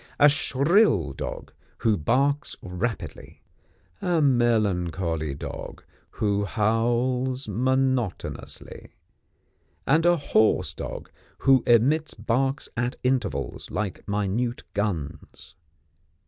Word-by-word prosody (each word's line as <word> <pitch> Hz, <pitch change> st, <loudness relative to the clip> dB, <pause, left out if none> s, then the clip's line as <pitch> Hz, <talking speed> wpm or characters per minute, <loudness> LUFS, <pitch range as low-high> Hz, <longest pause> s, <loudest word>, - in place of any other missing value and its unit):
A 145 Hz, -, +8 dB
shrill 140 Hz, -, +2 dB
dog, -, -, -6 dB, 0.3 s
who 110 Hz, -2 st, +4 dB
barks 135 Hz, -, +1 dB
rapidly; 100 Hz, +6 st, -5 dB, 0.6 s
a 175 Hz, -2 st, +1 dB
melancholy 95 Hz, -, +1 dB
dog, -, -, -7 dB, 0.3 s
who 105 Hz, -1 st, 0 dB
howls 120 Hz, +5 st, 0 dB
monotonously; 130 Hz, -1 st, -2 dB, 0.9 s
and 155 Hz, +4 st, +3 dB
a 175 Hz, 0 st, +5 dB
hoarse 110 Hz, -7 st, +2 dB
dog, -, -, -7 dB, 0.3 s
who 135 Hz, -2 st, +6 dB
emits 140 Hz, +7 st, +3 dB
barks 130 Hz, +6 st, -1 dB
at 120 Hz, +1 st, -1 dB
intervals, 125 Hz, -, -1 dB
like 95 Hz, +2 st, -4 dB
minute 105 Hz, +4 st, -1 dB
guns. 85 Hz, -4 st, -4 dB
120 Hz, 90 wpm, -25 LUFS, 100-135 Hz, 0.9 s, A